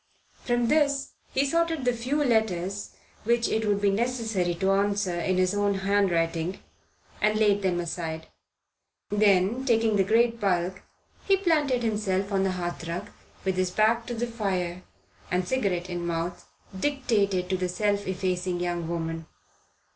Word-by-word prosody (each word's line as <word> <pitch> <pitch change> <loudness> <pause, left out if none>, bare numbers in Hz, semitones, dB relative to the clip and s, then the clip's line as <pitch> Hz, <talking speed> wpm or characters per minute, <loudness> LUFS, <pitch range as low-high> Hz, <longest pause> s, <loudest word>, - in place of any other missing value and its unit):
From 240 -1 +1
this 280 -1 +2 0.2
he 275 - +2
sorted 330 -1 0
the 245 - +3
few 260 +6 0
letters 205 -5 0 0.3
which 235 +1 +2
it 220 0 0
would 205 -1 +2
be 200 -1 +3
necessary 220 -5 0
to 190 +3 +1
answer 200 -1 +1
in 180 +2 0
his 185 +1 +2
own 205 -1 +1
handwriting, 185 -3 +1 0.6
and 215 0 +3
laid 205 -2 +3
them 180 -2 0
aside; 160 -2 -4 0.9
then 205 +3 +3
taking 225 -4 +2
the 195 - +4
great 230 +3 +2
bulk, 185 -1 0 0.5
he 390 -1 +5
planted 300 -9 +1
himself 205 -3 0
on 195 -1 +2
the 190 -1 +1
hearthrug, 175 +1 -4 0.4
with 190 -1 0
his 185 -1 +1
back 225 +4 +2
to 240 - -3
the 235 +1 -1
fire, 190 -6 -2 0.5
and, 180 0 0
cigarette 190 -8 0
in 175 -1 -4
mouth, 170 +1 -3 0.3
dictated 210 -9 +1
to - - +2
the 180 -1 -1
self 205 +2 0
effacing 185 -1 -1
young 175 -1 -2
woman. 165 -1 -3
200 Hz, 150 wpm, -27 LUFS, 180-230 Hz, 0.9 s, he